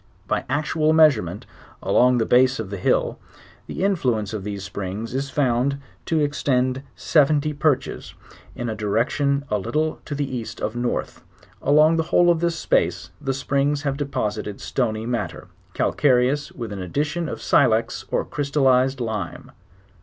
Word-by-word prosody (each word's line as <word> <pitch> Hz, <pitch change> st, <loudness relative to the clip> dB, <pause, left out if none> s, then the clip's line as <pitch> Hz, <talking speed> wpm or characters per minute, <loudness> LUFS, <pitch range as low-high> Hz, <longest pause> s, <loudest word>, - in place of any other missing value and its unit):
By -, -, -1 dB
actual 155 Hz, +2 st, +1 dB
measure 155 Hz, -8 st, +6 dB
ment 90 Hz, +3 st, -7 dB, 0.4 s
along 125 Hz, 0 st, +4 dB
the 115 Hz, -, +1 dB
base 130 Hz, +3 st, +4 dB
of 105 Hz, -4 st, -5 dB
the 100 Hz, -, -4 dB
hill -, -, +1 dB, 0.5 s
the -, -, -4 dB
influence 125 Hz, -, 0 dB
of 105 Hz, -3 st, -4 dB
the 100 Hz, 0 st, -4 dB
springs 100 Hz, +3 st, -5 dB
is 135 Hz, +1 st, -2 dB
found 135 Hz, 0 st, +1 dB, 0.3 s
to 160 Hz, -, +1 dB
extend 130 Hz, -3 st, 0 dB
seventy 150 Hz, 0 st, +2 dB
perches, 145 Hz, -1 st, -1 dB, 0.4 s
in 120 Hz, -, -4 dB
a 110 Hz, -, -2 dB
direction 120 Hz, +7 st, 0 dB
a 105 Hz, -, +1 dB
little 155 Hz, +10 st, -1 dB
to 145 Hz, -, -4 dB
the 145 Hz, 0 st, -1 dB
east 120 Hz, -4 st, -6 dB
of 110 Hz, -, -3 dB
north: 120 Hz, 0 st, -3 dB, 0.4 s
along 155 Hz, +3 st, +4 dB
the 160 Hz, -, +2 dB
whole 175 Hz, 0 st, +5 dB
of 170 Hz, -, +1 dB
this 170 Hz, 0 st, 0 dB
space 85 Hz, -, 0 dB
the 135 Hz, -2 st, -1 dB
springs 140 Hz, +2 st, 0 dB
have 140 Hz, -2 st, -1 dB
deposited 125 Hz, -8 st, -3 dB
stony 110 Hz, -4 st, -2 dB
matter, 120 Hz, 0 st, -4 dB, 0.3 s
calcareous 135 Hz, +1 st, +2 dB
with 115 Hz, -4 st, -6 dB
an 100 Hz, -, -5 dB
addition 150 Hz, -, -2 dB
of -, -, -5 dB
silex 115 Hz, -4 st, +2 dB
or -, -, 0 dB
cryitallized 135 Hz, -2 st, +2 dB
lime. 110 Hz, -7 st, -4 dB
130 Hz, 155 wpm, -23 LUFS, 110-145 Hz, 0.5 s, measure